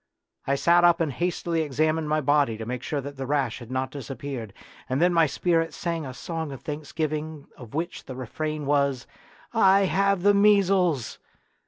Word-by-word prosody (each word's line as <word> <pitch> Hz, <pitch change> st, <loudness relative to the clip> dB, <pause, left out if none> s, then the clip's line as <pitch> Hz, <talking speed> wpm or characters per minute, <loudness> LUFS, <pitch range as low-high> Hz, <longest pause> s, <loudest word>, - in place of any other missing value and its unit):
I 140 Hz, -, +2 dB
sat 170 Hz, +5 st, +4 dB
up 175 Hz, 0 st, +5 dB
and 155 Hz, -5 st, 0 dB
hastily 170 Hz, +1 st, -1 dB
examined 155 Hz, +1 st, 0 dB
my 155 Hz, 0 st, +1 dB
body 145 Hz, -5 st, +2 dB
to 110 Hz, -, -6 dB
make 125 Hz, +1 st, -4 dB
sure 145 Hz, +2 st, -3 dB
that 140 Hz, +1 st, -8 dB
the 135 Hz, -1 st, -4 dB
rash 145 Hz, -1 st, 0 dB
had 120 Hz, -2 st, -11 dB
not 130 Hz, 0 st, -2 dB
disappeared, 135 Hz, -5 st, -6 dB, 0.4 s
and 130 Hz, +1 st, 0 dB
then 175 Hz, +2 st, +3 dB
my 165 Hz, -2 st, +4 dB
spirit 165 Hz, +2 st, 0 dB
sang 165 Hz, -4 st, -3 dB
a 130 Hz, -, -7 dB
song 160 Hz, -3 st, -5 dB
of 135 Hz, -, -8 dB
thanksgiving 155 Hz, 0 st, -4 dB
of 120 Hz, -1 st, -11 dB
which 170 Hz, +3 st, -4 dB
the 130 Hz, -, -7 dB
refrain 150 Hz, +4 st, -4 dB
was, 140 Hz, -2 st, +1 dB, 0.3 s
" -, -, -26 dB
I 195 Hz, -3 st, +5 dB
have 195 Hz, -1 st, +1 dB
the 205 Hz, 0 st, +6 dB
measles 195 Hz, -, +3 dB
155 Hz, 185 wpm, -25 LUFS, 135-170 Hz, 0.4 s, the